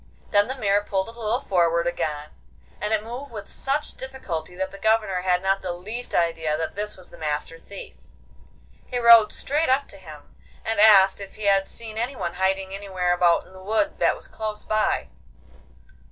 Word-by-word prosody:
Then 205 +1 +4
the 260 - -3
mare 205 -4 +1
pulled 195 +1 -1
a - - -8
little 230 +1 -1
forward 170 -6 +1
again, 150 -3 -2 0.5
and 210 +2 -2
it 215 -1 +1
moved 245 +5 -7
with 210 -3 -8
such 280 +2 -2
difficulty 185 -11 -6
that 190 +1 -3
the 195 - -11
Governor 215 -3 +2
had 180 0 +1
not 195 0 +1
the 180 -2 -3
least 215 +8 -6
idea 165 -2 +1
that 160 0 -3
this 210 0 -3
was 185 - -12
the - - -14
Master 150 +1 -3
Thief. 200 +3 -10 0.9
He 250 - -3
rode 235 -3 +7
straight 300 +2 0
up 270 +2 +2
to - - -9
him, 155 -6 -13 0.3
and 225 -2 -1
asked 200 -2 +7
if 195 - -9
he 215 - -9
had 195 -1 +3
seen 220 -1 -7
anyone 240 -8 -3
hiding 190 0 0
anywhere 190 -3 -1
about 175 -1 +3
in - - -18
a 190 - -12
wood 220 +10 0
that - - +3
was - - -8
close 215 -1 -5
by. 215 - 0
200 Hz, 190 wpm, -24 LUFS, 180-225 Hz, 0.9 s, rode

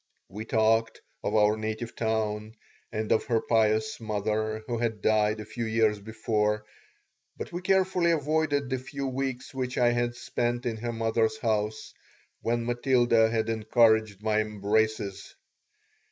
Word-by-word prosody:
We 105 +3 -7
talked 115 0 +2 0.2
of - - -1
our 105 0 +4
native 110 +2 -4
town 110 -1 -2 0.4
and 110 -1 -3
of - - +3
her 115 -2 +2
pious 110 -1 +1
mother, 110 0 -2
who 120 -2 -3
had 115 -2 -1
died 110 0 +2
a 110 - -6
few 115 +2 -4
years 110 -1 +2
before, 105 0 -1 0.7
but - - -6
we 175 - -4
carefully 185 -2 +2
avoided 150 -3 +1
the 130 - 0
few 140 +2 -5
weeks 135 +1 -3
which 130 -1 -3
I 120 -1 +4
had 120 0 0
spent 120 +1 -2
in 115 -2 -2
her 120 +2 -3
mother's 115 -1 0
house, 110 -1 -2 0.5
when 115 0 -1
Matilda 120 -2 +3
had 110 -1 0
encouraged 110 -2 +2
my 110 0 +2
embraces. 105 -1 -1
110 Hz, 145 wpm, -28 LUFS, 110-120 Hz, 0.7 s, our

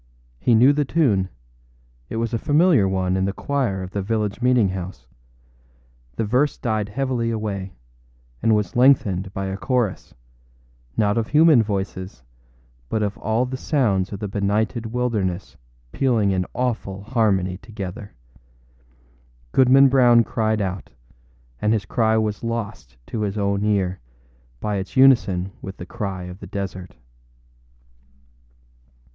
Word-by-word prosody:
He 120 - +3
knew 125 +6 +6
the 145 0 +1
tune; 125 - +1 0.8
it - - -5
was 115 +1 -2
a 115 - 0
familiar 150 - +3
one 95 -1 0
in 95 0 +1
the 100 - -1
choir 120 -8 -2
of 90 - -8
the 100 - -2
village 105 +1 -2
meeting 125 -5 +3
house. 95 0 -6 1.1
The 110 - -1
verse 125 +7 +1
died 110 -4 -2
heavily 125 0 -1
away, 105 -4 -4 0.7
and 110 - +3
was 105 -1 -2
lengthened 105 -8 +3
by 95 0 -4
a 95 0 -3
chorus, 120 -4 -2 0.8
not 105 +2 +2
of 110 - -2
human 155 -4 +5
voices, 95 - -4 0.7
but 110 -1 0
of 105 -1 -2
all 110 +3 0
the 130 +1 -5
sounds 105 - 0
of 100 - -6
the 105 - -3
benighted 105 +3 -1
wilderness 110 -6 -2 0.4
pealing 115 - +1
in 90 -1 -1
awful 115 -6 -2
harmony 100 -6 +1
together. 100 0 -8 1.4
Goodman 135 +1 +6
Brown 120 -3 +5
cried 110 -1 -1
out, 95 -1 -4 0.7
and 105 +1 +2
his 105 -4 -1
cry 110 +3 +1
was 110 -1 -1
lost 110 - -5
to 110 - -4
his 105 0 -2
own 100 0 0
ear 95 -3 0 0.6
by 105 - -2
its 95 +6 -6
unison 100 -9 +4
with 95 0 -8
the 90 - -7
cry 95 -1 -5
of 90 +1 -9
the - - -9
desert. 95 -2 -6
105 Hz, 140 wpm, -22 LUFS, 95-120 Hz, 1.4 s, knew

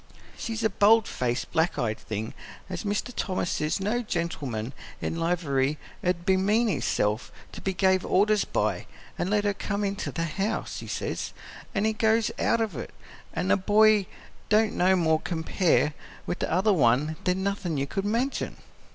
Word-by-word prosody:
She's 225 -1 -4
a 220 - +4
bold 215 +3 +5
faced, 120 -1 -2
black 165 +1 +1
eyed 110 -3 -1
thing, 110 +1 -5 0.4
as 180 - -4
Mr. 205 +4 -2
Thomas 185 -2 -1
says 150 +5 0
no 210 +5 0
gentleman 145 - -3 0.3
in 165 - -3
livery 155 -5 +1 0.3
'u'd 175 -1 0
bemean 200 +5 +3
hisself 105 - 0 0.2
to - - -9
be 190 -1 -2
gave 190 -1 +3
orders 210 +2 +3
by; - - -1 0.3
and 175 - 0
let 205 0 +2
her 205 -1 +1
come 200 +1 -3
into 200 0 -2
the 165 - -2
house, 195 +6 -2
he - - -8
says, - - -3 0.4
an' 200 +1 +2
he 220 - +2
goes 220 +1 +2
out 230 - +2
of 215 -7 -1
it. 120 - -7 0.4
An' 95 - -1
the - - +5
boy 210 0 +4 0.4
don't 215 0 +4
no 185 +1 +4
more 160 -3 +3
compare 160 -2 +1 0.3
with 175 - -3
the - - -2
other 190 +5 +3
one 145 +1 +3
than 185 +1 +1
nothin' 195 -5 -1
you 135 - 0
could 195 +7 -3
mention. 235 +7 -1
190 Hz, 170 wpm, -27 LUFS, 160-210 Hz, 0.4 s, bold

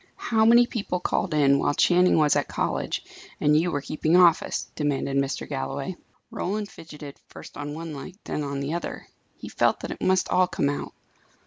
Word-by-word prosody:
"How 220 -1 +1
many 235 +2 +7
people 205 -6 -3
called 180 +1 -1
in, 140 -2 +4
while 145 - +1
Channing 180 +2 +4
was 150 -2 +4
at - - 0
college, - - -2 0.4
and 150 0 +3
you 165 +3 +3
were 145 -4 -2
keeping 155 +3 0
office?" 175 -2 +3
demanded 140 -2 -1
Mr. 135 0 -1
Galloway. 135 +4 -4 0.4
Roland 205 +2 -3
fidgeted, 150 -3 -11
first - - -12
on 145 0 -5
one 165 0 -6
leg, 145 +6 -8
then - - -3
on 140 -1 -3
the 140 +3 -3
other. 170 - -5 0.3
He - - -9
felt - - +1
that - - -5
it - - -8
must 185 0 +2
all 185 0 +3
come 140 - 0
out. 145 - -4
155 Hz, 190 wpm, -25 LUFS, 140-180 Hz, 0.4 s, many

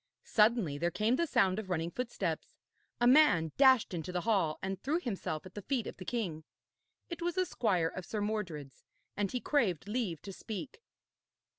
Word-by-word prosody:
Suddenly 210 -10 +3
there 170 - +1
came 215 +7 +1
the 335 +4 0
sound 215 -8 +2
of 205 -3 -7
running 170 -1 -1
footsteps; 195 -9 -3 0.4
a 240 - +3
man 245 - +5
dashed 260 -7 +5
into 175 +1 -4
the 180 0 -1
hall, 185 -7 +1
and 190 0 -3
threw 305 +6 0
himself 195 - -4
at 185 - -11
the 205 - -6
feet 250 +2 -1
of - - -7
the 185 - -9
king. 180 -10 -3 0.7
It 340 -1 -6
was 350 +1 -2
a 370 - +3
squire 185 - +1
of 185 - -7
Sir 215 - -3
Mordred's, 180 - -4 0.3
and 205 -2 -1
he 250 - -1
craved 205 - 0
leave 210 -8 -2
to 195 - -7
speak. 220 - -7
205 Hz, 185 wpm, -32 LUFS, 175-245 Hz, 0.7 s, man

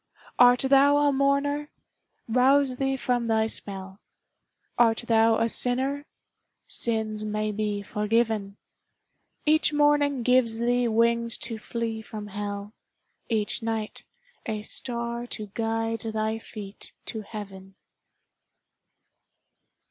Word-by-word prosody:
Art 245 0 +7
thou 275 +2 +5
a 290 0 +3
mourner? 280 +2 +1 0.6
Rouse 255 +2 +3
thee 270 0 0
from 245 -2 -1
thy 220 -1 +2
spell; 195 -3 -6 0.8
Art 230 -1 +3
thou 225 0 +4
a 230 - +2
sinner? 265 +5 0 0.6
Sins 220 -2 -1
may 215 0 -2
be 210 -1 -2
forgiven; 210 -1 -1 0.9
Each 310 0 +3
morning 290 -3 +2
gives 250 -2 +3
thee 240 +1 +1
wings 235 +1 +2
to 230 -2 -2
flee 225 0 -4
from 215 -1 -8
hell, 205 0 -5 0.6
Each 220 -1 0
night 225 -1 -3 0.4
a 215 -1 -3
star 235 +1 -4
to 210 -4 -5
guide 225 0 -1
thy 220 0 -2
feet 205 -3 -9
to 220 - -2
heaven. 195 -2 -9
225 Hz, 110 wpm, -26 LUFS, 215-250 Hz, 0.9 s, Art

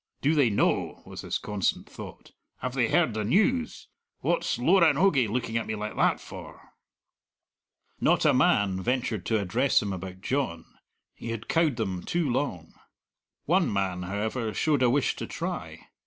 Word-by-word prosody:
"Do 145 +3 +2
they 145 -6 +4
know?" 100 - 0
was - - -8
his - - -2
constant 105 -3 -2
thought; - - -11 0.3
"have 130 +1 -3
they 125 -3 +2
heard 170 -9 +3
the 110 0 -2
news? 235 - +1 0.3
What's - - 0
Loranogie 165 - +4
looking 115 0 -1
at 115 - -3
me 110 - -2
like 105 0 -5
that - - +2
for?" - - -11 1.3
Not - - +2
a - - +5
man 95 -2 +2
ventured 120 -4 -1
to 110 -2 +2
address 115 +8 +2
him 100 -4 -3
about 95 0 -7
John 125 -10 -2 0.5
he 115 - -8
had 115 -1 -5
cowed 160 -5 +2
them 95 -6 -3
too 170 - -1
long. 120 - -2 0.7
One 175 +2 +2
man, 95 -3 -1
however, 110 +4 -3
showed 150 -4 +1
a 125 - +5
wish 135 +2 +1
to - - -5
try. - - -6
115 Hz, 160 wpm, -27 LUFS, 100-145 Hz, 1.3 s, a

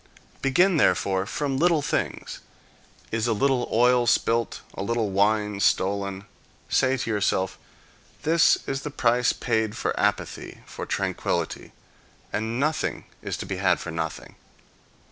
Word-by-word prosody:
Begin 170 +7 +3
therefore 95 -8 +2
from 140 +1 -2
little 165 -2 +3
things. 150 - -2 0.7
Is 115 +1 0
a 115 - +2
little 130 +2 +1
oil 125 +1 +4
spilt? 115 0 +1
A - - -6
little 110 0 -1
wine 105 +1 +1
stolen? 100 0 0 0.4
Say 130 0 +2
to 130 -2 -3
yourself, 95 -2 0 0.6
"This 165 +1 +4
is 135 0 -3
the 150 - -4
price 125 -2 +2
paid 110 -1 -1
for - - -1
equanimity, - - -2
for - - -7
tranquillity, - - -2 0.6
and 110 +3 -2
nothing 155 +2 -1 0.2
is - - -4
to - - -5
be 95 - -4
had 95 -1 +2
for 85 - -6
nothing." 80 -1 -5
115 Hz, 135 wpm, -25 LUFS, 100-135 Hz, 0.7 s, oil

